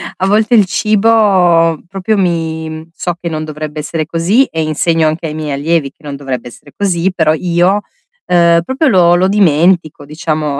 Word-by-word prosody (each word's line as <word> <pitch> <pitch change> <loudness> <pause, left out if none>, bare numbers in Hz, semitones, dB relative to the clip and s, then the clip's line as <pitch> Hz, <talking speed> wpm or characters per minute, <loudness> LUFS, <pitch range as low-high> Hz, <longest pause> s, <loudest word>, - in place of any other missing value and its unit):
a 190 - -1
volte 220 +4 +2
il 205 -3 +5
cibo 195 -6 +2
proprio 195 +3 -2
mi 160 -3 -3
so 175 -1 -3
che 170 - -3
non 155 -1 -4
dovrebbe 155 0 -6
essere 155 +1 -3
così, 185 - +1
e 160 -1 -3
insegno 160 +1 +1
anche 160 +1 -2
ai 150 - -6
miei 155 -2 -4
allievi 145 +1 -1
che - - -30
non 145 -1 -6
dovrebbe 135 -3 -5
essere 140 +4 -15
così, 190 -2 0
però 160 -3 +2
io, 175 +4 +1 0.4
ehm, 170 -1 +3
proprio 265 - -1
lo 175 -7 +4
lo 185 +2 +2
dimentico, 170 -5 +1
diciamo. 150 -2 -3
170 Hz, 175 wpm, -13 LUFS, 155-190 Hz, 0.4 s, il